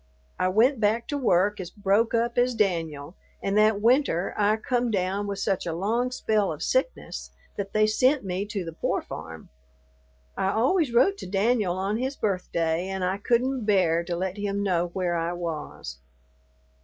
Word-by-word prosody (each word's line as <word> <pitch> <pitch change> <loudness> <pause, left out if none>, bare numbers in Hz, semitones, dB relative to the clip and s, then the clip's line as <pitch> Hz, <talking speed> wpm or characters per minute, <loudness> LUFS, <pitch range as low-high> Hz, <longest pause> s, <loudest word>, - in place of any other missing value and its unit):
I 185 - +2
went 225 +7 +3
back 220 +2 +1
to 290 - -1
work 205 -3 +2
as 180 -2 -5
broke 205 +3 +1
up 235 +1 0
as 245 0 +2
Danyul, 165 -7 -1 0.3
and 195 - 0
that 215 0 +4
winter 230 - +2
I 210 +1 +3
come 245 +2 -1
down 195 0 -1
with 200 -1 -3
such 195 -2 -1
a 165 - -2
long 225 +8 0
spell 215 -5 0
of - - -5
sickness - - -2 0.3
that 195 -1 -5
they 215 0 +4
sent 255 +4 +2
me 190 +2 -2
to 200 -4 -4
the 165 - -6
pore - - -1
farm. 80 -1 -9 0.9
I 190 - 0
always 270 +5 +2
wrote 390 +12 +3
to - - -7
Danyul 200 -1 +1
on 195 +3 -1
his 265 +2 -2
birthday 180 -5 -1
and 190 -1 -3
I 185 +2 0
couldn't 245 +2 0
bear 180 -5 +3
to 175 0 -2
let 185 +2 -3
him 200 0 -2
know 175 -3 +1
where 175 0 -2
I 170 +1 -1
was. 155 - -6
200 Hz, 180 wpm, -26 LUFS, 180-230 Hz, 0.9 s, that